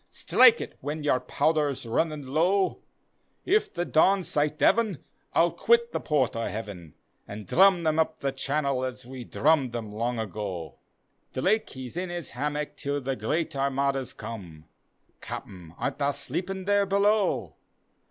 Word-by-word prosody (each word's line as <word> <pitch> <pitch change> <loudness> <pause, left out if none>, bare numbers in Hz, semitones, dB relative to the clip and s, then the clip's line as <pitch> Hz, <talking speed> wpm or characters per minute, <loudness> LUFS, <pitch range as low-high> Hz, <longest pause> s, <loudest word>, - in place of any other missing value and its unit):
Strike 470 - +5
et - - -6
when 150 +1 -4
your 135 -3 +2
powder's 145 +1 0
runnin' 150 +5 -1
low; 175 +8 +1 0.6
If 420 +2 +2
the 175 - -2
Dons 185 +3 +3
sight 150 +1 0
Devon, 225 -3 +3 0.4
I'll - - +4
quit 470 0 +2
the - - -2
port 145 -7 0
o' 115 - -2
Heaven, 100 -8 -7 0.3
An' 105 +1 -7
drum 185 - +4
them 155 0 +1
up 160 0 0
the 140 - -1
channel 135 -1 -1
as 130 -1 -5
we 130 0 -8
drummed 140 -4 +2
them 115 -3 -5
long 115 +3 -2
^o." 100 -6 -5 0.6
Drake 205 +11 +1
he's 130 +2 -8
in 180 0 -2
his 175 -1 -5
hammock 150 +4 -3
till 145 0 -2
the 135 0 -2
great 155 +2 -2
Armadas 135 -1 0
come, 85 -9 -8 0.6
(Capten, 90 -3 -8
art 140 - -3
tha 140 0 +1
sleepin' 190 +4 -4
there 200 0 +3
below?) 200 +1 +1
145 Hz, 150 wpm, -27 LUFS, 125-175 Hz, 0.6 s, Strike